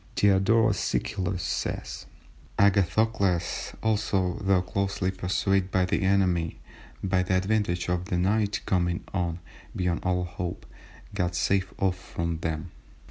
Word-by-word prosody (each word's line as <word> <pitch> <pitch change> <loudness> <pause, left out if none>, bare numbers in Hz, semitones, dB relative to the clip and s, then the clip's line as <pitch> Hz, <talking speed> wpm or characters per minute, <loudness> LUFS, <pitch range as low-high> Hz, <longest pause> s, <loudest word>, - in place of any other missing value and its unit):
Diodorus 105 +1 +4
Siculus 90 -1 -1
says:— - - -3 0.5
"Agathocles 100 -2 +2
also, 105 -3 +1
though 95 -2 +3
closely 95 0 -1
pursued 95 +1 0
by 95 -1 +2
the 90 - 0
enemy, 95 -4 +2 0.5
by 95 -1 +2
the 90 0 0
advantage 95 -3 0
of 90 0 -1
the 90 -2 -1
night 105 +2 +1
coming 90 -2 0
on 85 -3 -1 0.4
(beyond 90 -1 0
all 90 0 0
hope), 90 0 -5 0.5
got 90 -3 -1
safe 95 +2 +1
off 95 -2 0
from 85 -2 -3
them. 80 +1 -3
95 Hz, 125 wpm, -27 LUFS, 90-100 Hz, 0.5 s, Diodorus